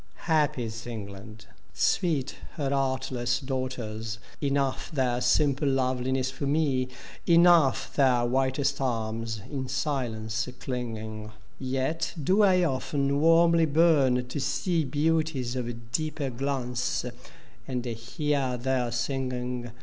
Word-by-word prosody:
Happy 150 -5 +2
is 115 +1 -6
England, 105 -1 -8 0.3
sweet 150 -7 +1 0.2
her 140 -3 -1
artless 130 -3 0
daugh 130 -1 -2
ters; 110 -3 -5 0.2
Enough 140 -2 0
their 125 -4 0
simple 145 0 +2
loveliness 130 0 0
for 140 +1 -4
me, 140 -4 +1 0.4
Enough 170 -5 +5
their 125 -4 +4
whitest 135 +3 +1
arms 115 -3 -2
in 135 -3 -3
silence 120 -5 -2
clinging: 110 -4 -5 0.3
Yet 135 +6 -1
do 190 +8 +4
I 185 -3 +5
often 140 -1 0
warmly 165 0 +5
bum 140 -5 +4
to 125 +4 -5
see 160 +4 0
Beauties 150 -3 0
of 115 -2 -5
deeper 155 -1 -1
glance, 125 -1 -2 0.6
and 125 -2 -3
hear 125 +3 -1
their 125 0 0
singing. 125 -1 -2
130 Hz, 110 wpm, -27 LUFS, 120-145 Hz, 0.6 s, Enough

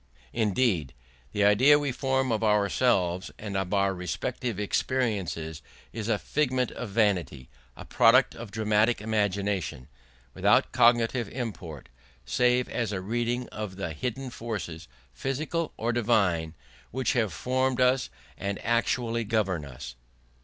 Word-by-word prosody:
Indeed, 105 - +1 0.4
the 105 - +1
idea 125 +9 +6
we 145 -2 -1
form 130 0 0
of 110 -1 0
ourselves 100 -3 +2
and 100 -2 -6
of 95 -2 -1
our 100 -1 +2
respective 95 +5 -3
experiences 95 - -1 0.3
is 110 0 -4
a 110 - +2
figment 130 -1 0
of 120 - -6
vanity, 90 - 0 0.3
a - - -9
product - - +5
of 115 -2 -8
dramatic 110 +2 +2
imagination, 100 - -1 0.5
without - - +3
cognitive 120 -1 +3
import 100 - -6 0.4
save 125 - +2
as 115 -4 -2
a 100 - -2
reading 120 +5 -2
of 105 -3 -6
the 95 -4 -4
hidden 125 - -4
forces, 105 -9 -5 0.3
physical 155 - -2
or 115 +1 -1
divine, 100 -9 +1 0.3
which 130 +2 -1
have 110 -6 +1
formed 130 0 0
us 125 +1 +3 0.3
and 100 0 -2
actually 115 0 +1
govern 100 -7 0
us. 70 -4 -8
110 Hz, 130 wpm, -27 LUFS, 95-125 Hz, 0.5 s, idea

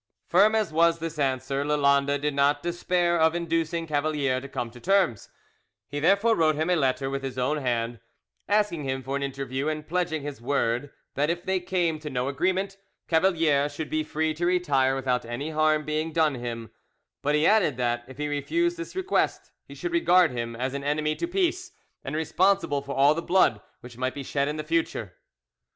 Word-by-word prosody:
Firm 205 +5 +4
as 215 -7 0
was 165 +1 +4
this 165 -1 -6
answer, 135 0 0
Lalande 140 -1 +2
did 145 +1 -2
not 140 +1 +2
despair 175 0 0
of 160 +1 +3
inducing 165 -1 -1
Cavalier 145 -4 0
to 140 - -9
come 125 -4 -4
to 120 - -13
terms: 185 - +1 0.6
he 145 - -4
therefore 200 +8 +3
wrote 155 -4 +3
him 160 +4 0
a - - +4
letter 135 -3 0
with 135 0 -3
his 135 -1 -5
own 130 +5 0
hand, 120 -4 -2 0.5
asking 205 -7 +1
him 130 -1 -3
for 135 +2 -3
an 140 - -2
interview, 135 0 -3
and 155 -1 -3
pledging 175 -3 -1
his 145 -4 -6
word 125 +1 0 0.2
that 145 +3 0
if 175 +1 -2
they 190 0 +1
came 175 -3 -1
to 150 -1 -6
no 125 -1 -2
agreement 185 +7 -1 0.3
Cavalier 160 -4 +2
should 150 +1 -6
be 155 0 0
free 155 +1 -1
to 175 +3 -1
retire 145 -8 +2
without 125 -2 0
any 120 +7 -5
harm 155 -1 +2
being 155 +1 -2
done 155 -2 +2
him; 120 -3 -6 0.5
but 145 +1 +1
he 150 +1 +2
added 185 - +3
that, 120 -1 -1
if 130 0 -12
he 150 0 -2
refused 335 - 0
this 335 +2 -7
request, 380 +1 -1 0.2
he - - -11
should 355 - -4
regard 185 - +4
him 115 -1 -4
as 130 +3 -3
an 140 0 -4
enemy 150 +1 0
to 340 - -2
peace, 365 0 -1 0.3
and 135 - -4
responsible 160 -1 +1
for 140 0 -6
all 140 +2 +5
the 165 - -3
blood 170 - +3 0.2
which 120 -1 -12
might 130 0 -1
be 140 - -5
shed 140 +1 -1
in 150 +1 -3
future. 335 - -1
150 Hz, 195 wpm, -26 LUFS, 135-175 Hz, 0.6 s, all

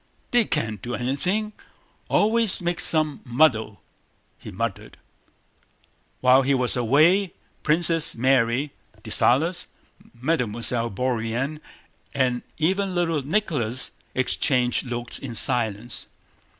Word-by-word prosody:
"They 240 -2 +3
can't 110 - -2
do 120 +3 -4
anything... 185 - -2 0.6
always 220 0 +3
make 175 -1 -2
some 155 -2 +1
muddle," 120 - +1 0.6
he - - -10
muttered. - - -5 1.2
While 130 +1 +5
he 135 +1 +1
was 125 -2 +2
away 155 - +3 0.3
Princess 165 +1 +3
Mary, 130 +2 +1 0.3
Dessalles, 165 +8 +2 0.5
Mademoiselle 120 -3 -1
Bourienne, 125 +6 -2 0.5
and 125 -2 +1 0.2
even 190 +4 0
little 165 -4 0
Nicholas 145 - -2 0.2
exchanged 125 -1 +1
looks 120 -1 -5
in 120 -4 -7
silence. 115 0 0
135 Hz, 100 wpm, -23 LUFS, 120-165 Hz, 1.2 s, While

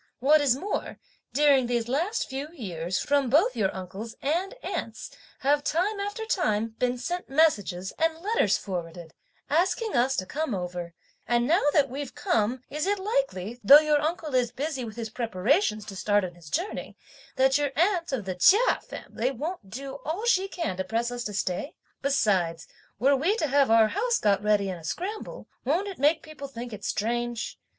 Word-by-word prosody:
What 295 +4 +5
is 270 -4 +3
more, 395 +10 -4 0.3
during 275 -1 +4
these 235 -1 -1
last 335 - -1
few 270 +2 -4
years 180 - -3
from 280 -3 +1
both 350 - +3
your 190 -2 +1
uncle's 190 +5 -7
and 345 - -1
aunt's - - -5 0.3
have, 290 +1 +2
time 390 +8 0
after 410 +3 -3
time, 225 - 0
been 250 0 +1
sent 350 +9 -4
messages, 205 - +1
and 325 0 +1
letters 360 - +1
forwarded, 170 -3 -6 0.3
asking 375 +7 +1
us 255 +2 +3
to 185 - -2
come 290 0 -2
over; 175 -2 -5 0.3
and 240 0 +2
now 335 +8 +3
that 285 -2 +4
we've 275 +1 -6
come, 250 - 0
is 300 +4 -3
it 410 +1 +2
likely, 245 - -2
though 275 +8 +10
your 300 -1 +3
uncle 315 -1 -2
is 250 -2 +2
busy 275 +1 -3
with 220 -2 -7
his 225 -2 -5
preparations 225 - +1
to 200 - -8
start 205 +1 +2
on 175 - -7
his 170 -3 -14
journey, 355 - -3 0.4
that 265 +1 +4
your 290 -2 0
aunt 345 0 +1
of 245 -7 -2
the 190 - -2
Chia 390 - +5
family 245 +3 -4
won't 280 - -5
do 270 +5 -6
all 350 +9 -3
she 390 -5 +3
can 335 - -3
to 190 - -1
press 230 +5 -1
us 245 0 -4
to 210 - -4
stay? 190 - -2 0.3
Besides, 185 -12 +1 0.3
were 275 +5 +4
we 330 +10 +1
to 450 - 0
have 280 -2 +3
our 225 -1 +5
house 475 - +1
got 200 -2 +2
ready 210 -1 +2
in 185 -2 -4
a - - -15
scramble, 390 - -5 0.2
won't 335 +10 0
it 390 -7 -7
make 300 +4 +3
people 310 -3 -8
think 240 -3 -7
it 205 - -8
strange? 240 +2 -2
265 Hz, 185 wpm, -27 LUFS, 210-320 Hz, 0.4 s, though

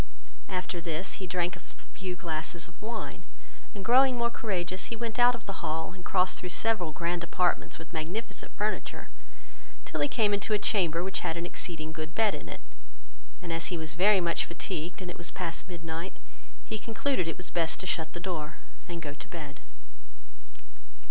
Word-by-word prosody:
After 180 -2 -1
this, 165 +4 -2
he 190 - -2
drank 175 0 +1
a - - -10 0.3
few 185 -2 -3
glasses 165 -1 -1
of 170 - -17
wine, 220 +1 -4 0.5
and 195 -2 -5
growing 255 +1 +7
more 235 0 +3
courageous, 185 -4 0
he 230 - -3
went 230 +1 -2
out 245 0 +8
of 235 - -10
the 195 - -4
hall, 160 +3 -1
and 185 -1 -11
crossed 185 0 +3
through 180 - -4
several 190 -4 +1
grand 170 +2 0
apartments 175 +1 +2
with 160 +1 -10
magnificent 175 +8 -2
furniture, - - -1 0.8
till - - -1
he - - +5
came 215 -6 +3
into 205 +2 +1
a - - +5
chamber, 180 -5 +3
which 190 0 0
had 165 - -1
an 170 - -1
exceeding 160 -3 -2
good 160 +1 -5
bed 220 -2 +5
in - - -5
it, - - -6 0.8
and 170 -2 -2
as 165 0 +1
he 180 - 0
was 160 -1 -3
very 195 +4 +7
much 170 -2 +2
fatigued, 170 +1 -3
and 180 - -3
it - - -10
was 170 - +2
past 180 0 -2
midnight, 165 +1 -4 0.5
he 220 - -2
concluded 225 -3 +1
it 165 - -1
was 180 - -3
best 165 -2 +2
to - - -4
shut 160 -3 0
the - - -4
door, 165 -4 -3 0.3
and 170 -1 -3
go 145 -2 -3
to - - -8
bed. 150 -4 -6
180 Hz, 190 wpm, -31 LUFS, 165-200 Hz, 0.8 s, out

